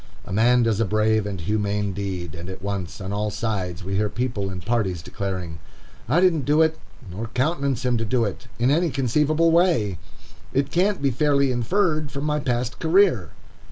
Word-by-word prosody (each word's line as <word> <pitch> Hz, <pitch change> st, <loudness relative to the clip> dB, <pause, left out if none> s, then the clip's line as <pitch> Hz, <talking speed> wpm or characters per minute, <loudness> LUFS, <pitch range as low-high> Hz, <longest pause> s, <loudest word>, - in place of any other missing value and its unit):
A -, -, -6 dB
man 120 Hz, +4 st, +4 dB
does 110 Hz, -2 st, +1 dB
a 115 Hz, -, +2 dB
brave 110 Hz, +1 st, +1 dB
and 100 Hz, -3 st, -4 dB
humane 105 Hz, +2 st, -1 dB
deed, 90 Hz, -4 st, -4 dB
and 85 Hz, +3 st, -8 dB
at 95 Hz, 0 st, -8 dB
once, 100 Hz, -4 st, -4 dB
on 95 Hz, 0 st, -5 dB
all 105 Hz, +1 st, -1 dB
sides, 100 Hz, -5 st, -3 dB
we 95 Hz, +1 st, -2 dB
hear 105 Hz, 0 st, +1 dB
people 115 Hz, -5 st, -2 dB
and 90 Hz, -2 st, -7 dB
parties 100 Hz, -8 st, 0 dB
declaring, 90 Hz, -4 st, -5 dB, 0.5 s
"I 155 Hz, +7 st, +4 dB
didn't 175 Hz, -5 st, +3 dB
do 150 Hz, +2 st, +4 dB
it, 160 Hz, 0 st, 0 dB, 0.3 s
nor 110 Hz, +6 st, -5 dB
countenance 135 Hz, +1 st, -1 dB
him 125 Hz, -1 st, +2 dB
to 115 Hz, -, -1 dB
do 115 Hz, +2 st, +1 dB
it, 105 Hz, +3 st, -6 dB
in 120 Hz, +3 st, +2 dB
any 170 Hz, +3 st, +2 dB
conceivable 150 Hz, +5 st, +2 dB
way. 160 Hz, -, +2 dB, 0.5 s
It 140 Hz, +1 st, 0 dB
can't 185 Hz, -2 st, +1 dB
be 140 Hz, -, +3 dB
fairly 140 Hz, +1 st, +2 dB
inferred 155 Hz, -, 0 dB
from 140 Hz, 0 st, -4 dB
my 150 Hz, 0 st, 0 dB
past 125 Hz, -3 st, -2 dB
career." 165 Hz, -, +3 dB
115 Hz, 190 wpm, -23 LUFS, 100-145 Hz, 0.5 s, man